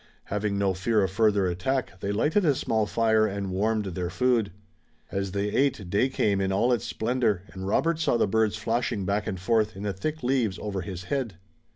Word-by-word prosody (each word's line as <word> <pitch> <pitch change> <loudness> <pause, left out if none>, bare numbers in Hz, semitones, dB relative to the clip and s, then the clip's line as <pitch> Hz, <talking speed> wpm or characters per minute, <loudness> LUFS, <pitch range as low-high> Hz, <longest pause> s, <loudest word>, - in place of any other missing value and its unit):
Having 105 0 -2
no 100 -1 +1
fear 105 +3 +1
of 95 - -1
further 105 -1 +3
attack, 95 +4 -2
they 100 - -2
lighted 150 - +2
a 150 -5 +3
small 110 -3 0
fire 110 -1 +3
and 100 -2 -3
warmed 105 +3 0
their 90 -1 -3
food. 120 -1 +1 0.6
As 100 -1 -2
they 100 +1 -1
ate 110 -7 0
day 115 +6 +2
came 100 -6 +1
in 95 0 0
all 120 +6 +2
its 120 0 -1
splendor 115 -5 0
and 95 0 -7
Robert 165 +10 +1
saw 160 - +2
the - - +3
birds 110 +1 +1
flashing 115 -4 -1
back 100 +3 -1
and 95 -4 -3
forth 110 +2 +1
in 95 - -7
the 100 -1 -1
thick 155 - -4
leaves 120 -6 +1
over 100 -3 -4
his 90 -2 -6
head. 125 -3 -2
105 Hz, 205 wpm, -26 LUFS, 95-120 Hz, 0.6 s, further